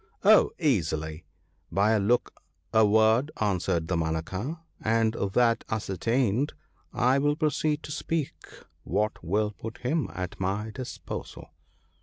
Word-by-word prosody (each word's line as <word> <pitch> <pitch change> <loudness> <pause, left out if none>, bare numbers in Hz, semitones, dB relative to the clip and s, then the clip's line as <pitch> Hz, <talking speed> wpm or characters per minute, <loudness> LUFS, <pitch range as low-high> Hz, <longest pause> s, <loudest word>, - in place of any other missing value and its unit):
' - - -37
Oh, - - +7
easily! 80 - -1 0.5
by 100 +3 +3
a 110 - +3
look, 115 +5 +1 0.4
a 110 0 +6
word/ 110 +6 +4
answered 90 -5 0
Damanaka; 85 - -2
' - - -42
and 110 0 +2
that 115 +3 +1
ascertained, 115 - 0 0.4
I 130 +3 +3
will 145 +1 +2
proceed 155 0 0
to - - -7
speak 155 -1 -2 0.5
what 105 -3 -1
will 105 +5 0
put 110 +2 -8
him 140 +4 -1
at 90 -1 -5
my 100 +4 -2
disposal.' 130 +1 -7
110 Hz, 130 wpm, -27 LUFS, 95-130 Hz, 0.5 s, Oh